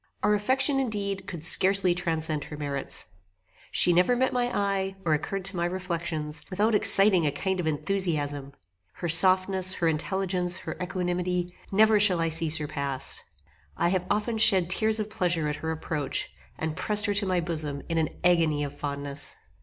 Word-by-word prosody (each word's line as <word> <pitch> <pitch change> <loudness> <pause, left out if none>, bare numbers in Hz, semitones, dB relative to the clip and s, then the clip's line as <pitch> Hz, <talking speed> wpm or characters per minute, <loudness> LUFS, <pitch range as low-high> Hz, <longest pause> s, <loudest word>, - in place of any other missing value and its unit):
Our 210 +1 +2
affection 265 +6 +2
indeed 200 -6 -3
could 170 -4 -6
scarcely 190 +1 +6
transcend 160 -4 -2
her 150 - -9
merits. 140 -2 -3 0.6
She 175 - +4
never 180 +8 +2
met 260 +1 0
my 245 -1 0
eye, 195 -1 -2
or 160 - +2
occurred 185 +5 -3
to 195 0 0
my 170 -1 -1
reflections, 170 -4 -4
without 210 +4 0
exciting 195 -5 +5
a - - 0
kind 190 +6 -3
of 170 - -2
enthusiasm. 150 -5 -3 0.4
Her 175 - -6
softness, 185 +2 +4
her 170 - -1
intelligence, 180 +2 -1
her - - -7
equanimity, 180 0 -3 0.2
never 215 +1 +4
shall 195 -4 +4
I 165 0 0
see 165 0 0
surpassed. 140 -3 -2 0.5
I 170 - +1
have 185 0 -2
often 215 +2 -1
shed 185 -5 +4
tears 220 +2 +2
of 215 - -3
pleasure 170 -5 -1
at 150 0 -3
her 160 - -5
approach, 155 -3 -4 0.3
and 160 -1 -4
pressed 210 +3 +1
her 205 - 0
to 200 0 -1
my 185 -1 0
bosom 155 -4 -3
in 165 -1 -1
an 160 - -1
agony 165 -4 +2
of 145 0 -6
fondness. 140 -1 -5
180 Hz, 170 wpm, -26 LUFS, 155-195 Hz, 0.6 s, scarcely